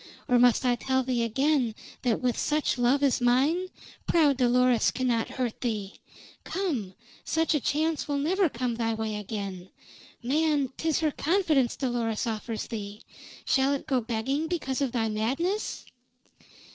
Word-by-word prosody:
Or 250 -1 +4
must 245 +1 +4
I 250 - +4
tell 260 +2 0
thee 250 -2 0
again 250 0 +1 0.3
that 240 -4 0
with 250 -2 +1
such 300 -3 0
love 255 +4 +3
as 270 -3 +2
mine 275 +10 +2 0.4
proud 300 -5 +4
Dolores 250 -1 +3
cannot 245 -3 0
hurt 245 -3 -2
thee. 210 -5 -2 0.5
Come! 260 - -3 0.3
Such 325 +1 +1
a 300 - +2
chance 310 +3 0
will 290 -1 -1
never 350 +5 +2
come 245 -1 -2
thy 225 -1 0
way 220 -1 -3
again. 200 -3 -5 0.5
Man! 290 0 +1
'Tis 320 -1 0
her 310 -1 +2
confidence 310 -7 +1
Dolores 240 -3 -1
offers 225 0 -3
thee. 210 -2 -7 0.4
Shall 270 +1 +2
it 280 - -3
go 260 -3 +1
begging 250 +7 -2
because 290 -6 -2
of 270 -3 0
thy 230 -2 0
madness?" 270 - -2
255 Hz, 150 wpm, -27 LUFS, 230-295 Hz, 0.5 s, Or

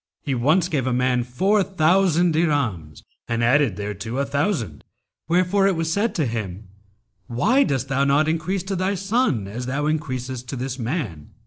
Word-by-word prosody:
He 140 - -1
once 155 +9 +2
gave 140 -8 -1
a 130 - +1
man 125 0 +1
four 190 - +1
thousand 180 -1 +2
dirhams 125 - -1 0.2
and 115 0 -1
added 125 -3 +3
thereto 105 +3 -5
a 140 - +1
thousand, 140 - -2 0.4
wherefore 185 +4 +3
it 195 - +2
was 165 0 -1
said 215 +5 0
to 155 - +1
him, 105 -4 -5 0.6
'Why 225 - +3
dost 135 - -1
thou 135 0 +1
not 140 +2 +3
increase 165 +4 -1
to 195 +1 -3
thy 190 +2 0
son 195 - 0
as 120 +5 -6
thou 140 +3 -1
increasest 130 -5 -3
to - - -4
this 130 +1 -4
man?' 115 - -4
140 Hz, 175 wpm, -22 LUFS, 120-175 Hz, 0.6 s, added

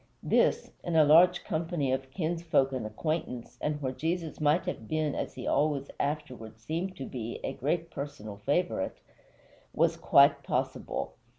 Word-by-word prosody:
This - - +2
in 175 -2 -2
a 160 - +7
large 175 +4 +6
company 160 -4 -1
of 130 0 -2
kinsfolk 165 -4 +1
and 125 -5 -3
acquaintance, 125 +1 -4
and 150 0 -1
where 130 - 0
Jesus 160 +3 -3
might 150 +3 +3
have 110 - -4
been, 155 -2 0
as - - -4
he - - -6
always 145 -2 +1
afterward 130 -7 -3
seemed 170 +10 -3
to 135 - -5
be, 120 -3 -5
a - - -2
great 165 +5 -1
personal 140 -8 -6
favorite 180 - -1 0.8
was - - +3
quite - - +5
possible. - - -2
150 Hz, 155 wpm, -29 LUFS, 130-165 Hz, 0.8 s, a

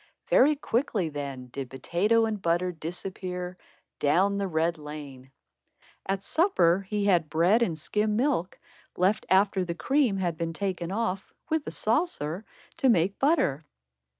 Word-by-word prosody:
Very 295 +3 +6
quickly 230 - -1
then 140 -4 -6
did 135 0 -6
potato 195 - +1
and 215 -3 -3
butter 175 +1 +1
disappear 180 +2 -5 0.4
"down 195 +7 +2
the 200 - -1
red 165 -1 0
lane." 145 -3 -9 0.8
At 195 0 -1
supper, 195 - +2
he 210 -1 0
had 175 -6 +3
bread 175 +8 +3
and 175 -9 0
skim 210 +6 0
milk, 240 - 0 0.4
left 195 +4 +1
after 195 0 +3
the 170 -1 -4
cream 245 - +1
had 175 -4 -1
been 165 0 -3
taken 185 -2 -3
off, 195 -2 -2 0.2
with 315 -2 0
a - - -3
saucer, 215 - -1 0.3
to 270 -5 +3
make 195 -2 +2
butter. 270 - +2
185 Hz, 145 wpm, -27 LUFS, 165-215 Hz, 0.8 s, Very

